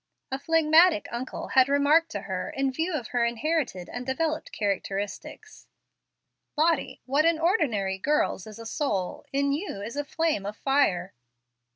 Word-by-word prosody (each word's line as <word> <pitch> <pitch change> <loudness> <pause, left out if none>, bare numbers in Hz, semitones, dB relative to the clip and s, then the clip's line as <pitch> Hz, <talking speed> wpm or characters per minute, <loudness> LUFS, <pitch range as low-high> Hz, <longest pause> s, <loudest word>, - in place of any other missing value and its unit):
A 265 - -2
phlegmatic 320 +1 +4
uncle 240 +2 -5
had 260 0 +5
remarked 290 +4 +4
to - - -4
her, 185 -2 -4
in 270 0 -1
view 320 +7 -2
of 245 -7 -4
inherited 240 - 0
and 245 - -6
developed 310 +4 -2
characteristics, 205 - -4 0.9
"Lottie, 320 0 +1
what 280 +4 +2
in 330 0 +3
ordinary 235 - +1
girls 295 -6 0
is 215 - -10
a 230 - -9
soul, 205 -8 -2
in 280 +1 +1
you 300 - -3
is 230 +5 -6
a 290 - -1
flame 315 -7 -1
of 205 +1 -6
fire." 195 -10 +1
275 Hz, 150 wpm, -27 LUFS, 215-315 Hz, 0.9 s, had